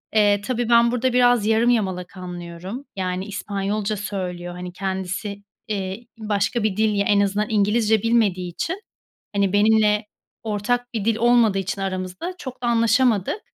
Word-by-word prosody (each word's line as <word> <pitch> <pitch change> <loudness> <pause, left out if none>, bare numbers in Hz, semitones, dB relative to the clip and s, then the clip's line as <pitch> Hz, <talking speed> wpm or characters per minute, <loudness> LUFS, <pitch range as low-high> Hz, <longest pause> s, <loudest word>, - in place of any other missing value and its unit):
Eee, 205 -1 +4
tabii, 235 +2 -2
ben 235 0 +5
burada 250 +1 0
biraz 245 -3 +4
yarım 225 +2 +3
yamalak 190 -6 -1
anlıyorum. 180 +6 -7
Yani, 185 0 -2
İspanyolca 205 +1 -2
söylüyor. 180 -3 -4
Hani, 180 0 -7
kendisi, 190 +2 -4 0.2
iii, 200 +2 -4
başka 210 +2 0
bir 210 -3 0
dil, 215 -1 +2
ya 200 - +1
en 205 - +3
azından 200 +1 +1
İngilizce 215 0 +2
bilmediği 205 -6 +1
için, 350 - -4 0.5
hani, 200 -2 +1
benimle 210 0 +3 0.4
ortak 225 +3 -1
bir 215 -3 -2
dil 225 0 +2
olmadığı 230 -3 +4
için 195 +1 -3
aramızda 185 - -4
çok 255 -4 -8
da - - -1
anlaşamadık. 230 - +2
210 Hz, 150 wpm, -22 LUFS, 190-230 Hz, 0.5 s, ben